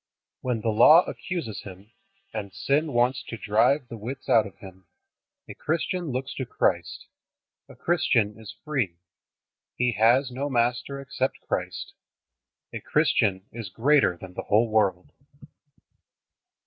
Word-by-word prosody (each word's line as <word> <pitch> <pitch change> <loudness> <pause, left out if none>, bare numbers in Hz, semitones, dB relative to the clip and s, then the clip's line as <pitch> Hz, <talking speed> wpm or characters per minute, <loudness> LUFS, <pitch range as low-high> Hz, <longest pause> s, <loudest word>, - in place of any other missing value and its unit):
When 125 -3 -2
the 115 - 0
Law 155 +10 +7
accuses 175 - -5
him, 95 +2 -12 0.4
and 100 -3 -5
sin 140 +10 0
wants 125 +1 +2
to 115 - -6
drive 115 +7 +2
the 115 -1 -8
wits 125 +5 -7
out 110 -2 +5
of 100 - -15
him, 95 -4 -14 0.6
a - - -8
Christian 170 +3 -2
looks 130 +1 -3
to 130 - -2
Christ. 85 -7 -1 0.6
A - - -13
Christian 115 -11 +1
is 110 - -10
free. 130 - -1 0.8
He 125 0 +1
has 120 +5 +3
no 135 +3 -3
master 125 +2 0
except 135 -1 -3
Christ. - - -3 0.8
A - - -4
Christian 95 -2 +1
is 115 -4 -7
greater 130 -2 +3
than 90 0 -11
the - - -4
whole 110 +2 +2
world. 100 -5 +1
120 Hz, 135 wpm, -26 LUFS, 105-135 Hz, 0.8 s, Law